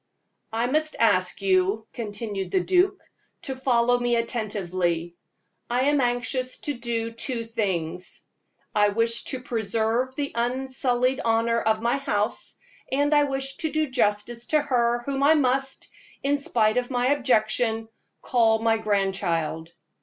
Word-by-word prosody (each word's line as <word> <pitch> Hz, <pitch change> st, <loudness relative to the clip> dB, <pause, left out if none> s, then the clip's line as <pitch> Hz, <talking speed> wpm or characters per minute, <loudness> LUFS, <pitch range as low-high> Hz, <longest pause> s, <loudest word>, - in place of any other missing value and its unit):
"I 225 Hz, +2 st, 0 dB
must 310 Hz, +4 st, 0 dB
ask 185 Hz, -4 st, +2 dB
you," 195 Hz, +3 st, +2 dB
continued 205 Hz, -4 st, -4 dB
the 190 Hz, -, +2 dB
duke, 370 Hz, -, +2 dB, 0.4 s
"to 270 Hz, -5 st, -4 dB
follow 245 Hz, -2 st, +2 dB
me 245 Hz, -1 st, +1 dB
attentively. 185 Hz, -7 st, -2 dB, 0.6 s
I 245 Hz, +1 st, +1 dB
am 285 Hz, +1 st, +3 dB
anxious 250 Hz, +1 st, -1 dB
to 290 Hz, -, -2 dB
do 235 Hz, -2 st, -3 dB
two 230 Hz, +1 st, -4 dB
things 185 Hz, -7 st, -3 dB, 0.5 s
I 205 Hz, -1 st, +4 dB
wish 230 Hz, +2 st, 0 dB
to 260 Hz, -2 st, -4 dB
preserve 230 Hz, +3 st, -1 dB
the 285 Hz, -1 st, -3 dB
unsullied 255 Hz, +1 st, 0 dB
honor 230 Hz, 0 st, +2 dB
of 220 Hz, 0 st, +1 dB
my 235 Hz, +3 st, +2 dB
house, 210 Hz, -5 st, -2 dB, 0.4 s
and 285 Hz, +3 st, +2 dB
I 295 Hz, -1 st, +5 dB
wish 270 Hz, 0 st, -3 dB
to 315 Hz, -2 st, -2 dB
do 310 Hz, 0 st, +1 dB
justice 235 Hz, 0 st, 0 dB
to 305 Hz, -1 st, +3 dB
her 240 Hz, -4 st, +1 dB
whom 275 Hz, +1 st, -2 dB
I 295 Hz, +3 st, +6 dB
must, 270 Hz, -1 st, 0 dB, 0.3 s
in 285 Hz, +1 st, +1 dB
spite 225 Hz, -4 st, +1 dB
of 250 Hz, -1 st, 0 dB
my 250 Hz, -1 st, +1 dB
objection, 225 Hz, -4 st, +1 dB, 0.4 s
call 225 Hz, -3 st, +3 dB
my 225 Hz, 0 st, +2 dB
grandchild. 190 Hz, -6 st, -1 dB
235 Hz, 140 wpm, -25 LUFS, 215-260 Hz, 0.6 s, I